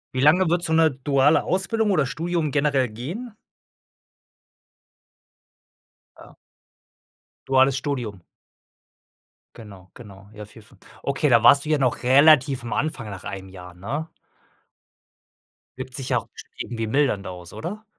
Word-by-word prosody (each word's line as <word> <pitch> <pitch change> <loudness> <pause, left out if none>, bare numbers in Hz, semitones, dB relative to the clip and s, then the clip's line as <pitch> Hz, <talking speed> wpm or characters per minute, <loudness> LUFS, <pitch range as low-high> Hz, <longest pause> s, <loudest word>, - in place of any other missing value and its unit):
Wie 130 - 0
lange 160 +5 +4
würde 175 +1 0
so 160 - -2
'ne 160 -1 +4
duale 140 +2 +2
Ausbildung 210 +4 -1
oder 155 -8 +2
Studium 160 +3 -2
generell 140 -3 +1
gehen? 170 - -7 2.8
Ah. - - -16 1.1
Duales 135 0 +3
Studium? 120 - -4 1.3
Genau, 100 -5 -14
genau, 100 -4 -14
ja, 105 0 -9
4, 105 +1 -16
5 - - -22 0.2
Okay, 140 +1 0
da 115 -2 +4
warst 140 +5 +6
du - - -5
ja 155 - +3
noch 130 -3 0
relativ 135 0 +4
am 120 - -5
Anfang 135 -8 -3
nach 95 - -9
einem 95 0 -7
Jahr, 90 -2 -12
ne? 145 - -5 1.7
Wirkt 130 0 -7
sich 135 -2 -6
ja - - +2
auch - - -14
bestimmt - - -15
irgendwie 115 -2 -4
mildernd 115 -6 0
aus, 90 -1 -9
oder? 210 +7 -7
135 Hz, 135 wpm, -23 LUFS, 110-155 Hz, 2.8 s, warst